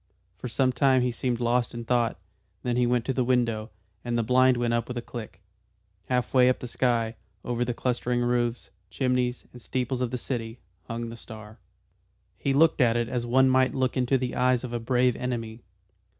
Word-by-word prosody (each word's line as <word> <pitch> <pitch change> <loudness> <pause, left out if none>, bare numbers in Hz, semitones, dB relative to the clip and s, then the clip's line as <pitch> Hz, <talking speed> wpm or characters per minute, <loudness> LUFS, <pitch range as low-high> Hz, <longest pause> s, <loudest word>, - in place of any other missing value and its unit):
For - - -6
some 130 +3 +1
time 130 0 +3
he 125 - +1
seemed 120 0 -2
lost 120 0 0
in 120 0 -6
thought. 120 -1 +1 0.5
Then 125 -1 0
he 125 0 +2
went 120 -1 +1
to 135 - 0
the 130 - +1
window, 120 -3 0 0.3
and 120 -1 -1
the 115 - +1
blind 130 +2 +4
went 120 -1 0
up 120 0 0
with 125 - -5
a - - -2
click. 110 -7 -8 0.7
Half 125 -4 -1
way 125 -1 +6
up 130 - +2
the 125 - -7
sky, 115 -2 0 0.3
over 120 0 -1
the 120 -1 -2
clustering 125 0 -1
roofs, 120 -1 -1 0.2
chimneys 125 -2 -1
and 125 - -12
steeples 130 +1 -2
of 125 - 0
the 125 - -3
city, 115 -2 -4 0.3
hung 115 0 -4
the 115 - -8
star. 110 -1 -11 0.8
He 140 - 0
looked 155 +2 +4
at 120 -2 +4
it 120 0 -1
as 120 -2 -2
one 130 +2 +4
might 130 0 +3
look 130 -1 0
into 130 +1 +2
the 125 -1 -3
eyes 125 -1 +2
of 125 -1 -5
a 120 - -1
brave 125 +1 +2
enemy. 115 -2 -4
125 Hz, 205 wpm, -27 LUFS, 115-125 Hz, 0.8 s, way